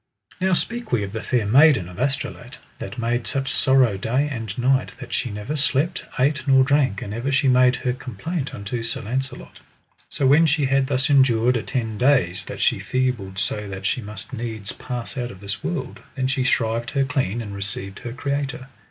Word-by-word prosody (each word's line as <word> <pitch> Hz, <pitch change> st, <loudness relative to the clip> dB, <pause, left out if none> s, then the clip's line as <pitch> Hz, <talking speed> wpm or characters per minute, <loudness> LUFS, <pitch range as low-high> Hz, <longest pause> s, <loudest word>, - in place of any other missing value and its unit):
Now 190 Hz, 0 st, +2 dB
speak 235 Hz, +6 st, -1 dB
we 120 Hz, -4 st, +2 dB
of 100 Hz, +1 st, -6 dB
the 110 Hz, -, -3 dB
Fair 120 Hz, -4 st, 0 dB
Maiden 130 Hz, -, +5 dB
of 90 Hz, +3 st, -10 dB
Astolat 135 Hz, +2 st, -3 dB, 0.2 s
that -, -, -6 dB
made 120 Hz, 0 st, -1 dB
such 135 Hz, -1 st, -1 dB
sorrow 130 Hz, -7 st, +4 dB
day 125 Hz, +9 st, 0 dB
and 115 Hz, -5 st, -5 dB
night 130 Hz, +1 st, +2 dB
that 125 Hz, -2 st, -8 dB
she 125 Hz, -, -1 dB
never 105 Hz, +8 st, -4 dB
slept, 150 Hz, +4 st, 0 dB
ate, 140 Hz, +3 st, +2 dB
nor 135 Hz, -1 st, +6 dB
drank, 135 Hz, -7 st, +2 dB
and 100 Hz, -, -6 dB
ever 120 Hz, +5 st, -2 dB
she 135 Hz, +1 st, +3 dB
made 125 Hz, 0 st, +5 dB
her 125 Hz, -2 st, -1 dB
complaint 130 Hz, -, -4 dB
unto 100 Hz, +4 st, -4 dB
Sir 115 Hz, 0 st, -4 dB
Launcelot. 130 Hz, +5 st, -4 dB, 0.5 s
So 140 Hz, -, -1 dB
when 150 Hz, +5 st, +6 dB
she 150 Hz, -1 st, +2 dB
had 135 Hz, 0 st, +2 dB
thus 130 Hz, -1 st, +1 dB
endured 125 Hz, -3 st, +4 dB
a 115 Hz, -, 0 dB
ten 110 Hz, -4 st, -3 dB
days, 125 Hz, -10 st, +3 dB
that -, -, -6 dB
she -, -, +3 dB
feebled 125 Hz, -7 st, -1 dB
so 105 Hz, +1 st, -2 dB
that 100 Hz, 0 st, -6 dB
she 125 Hz, -, 0 dB
must 105 Hz, 0 st, -8 dB
needs 110 Hz, -3 st, -4 dB
pass 125 Hz, +2 st, -6 dB
out 120 Hz, -1 st, -2 dB
of 95 Hz, -, -11 dB
this 100 Hz, -1 st, -6 dB
world, -, -, -3 dB, 0.2 s
then 130 Hz, -2 st, -1 dB
she 130 Hz, 0 st, +1 dB
shrived 115 Hz, -2 st, +1 dB
her 135 Hz, -, +4 dB
clean, 125 Hz, -5 st, -1 dB
and 105 Hz, -4 st, -5 dB
received 100 Hz, -1 st, -5 dB
her 120 Hz, -, -6 dB
Creator. 135 Hz, 0 st, -3 dB
125 Hz, 200 wpm, -23 LUFS, 110-135 Hz, 0.5 s, nor